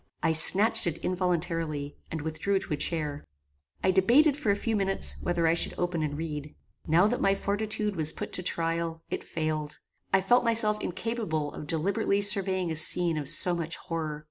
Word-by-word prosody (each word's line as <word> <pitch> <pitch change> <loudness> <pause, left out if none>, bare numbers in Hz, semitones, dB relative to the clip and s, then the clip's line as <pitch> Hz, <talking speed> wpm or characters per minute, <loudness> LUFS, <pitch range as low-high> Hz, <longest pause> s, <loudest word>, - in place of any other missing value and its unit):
I - - +2
snatched 200 +7 +7
it 165 -1 -2
involuntarily, 165 -5 -3
and 160 -2 -6
withdrew 160 +6 -2
to 190 - -5
a - - 0
chair. 150 -1 -3 0.6
I 190 - +2
debated, 245 - +3
for 290 -7 -4
a 200 - +3
few 225 +2 -3
minutes, 195 -1 +3
whether 175 -1 -1
I 165 - +3
should 170 - 0
open 175 -2 -2
and 145 -1 -4
read. 150 -2 -7 0.3
Now 170 +5 +3
that 235 +4 -1
my 195 0 +2
fortitude 210 +1 -3
was 160 -2 0
put - - -8
to - - +3
trial, 165 -1 -2
it - - -4
failed. 155 -2 -4 0.3
I 195 - +3
felt 245 +6 +2
myself 220 -2 +2
incapable 175 -8 -4
of 150 - -9
deliberately 190 +5 -1
surveying 190 -3 +2
a - - -3
scene 170 +1 +3
of 140 -2 -5
so 175 +3 +2
much 165 -1 -4
horror. 160 -4 -6
175 Hz, 185 wpm, -27 LUFS, 160-200 Hz, 0.6 s, snatched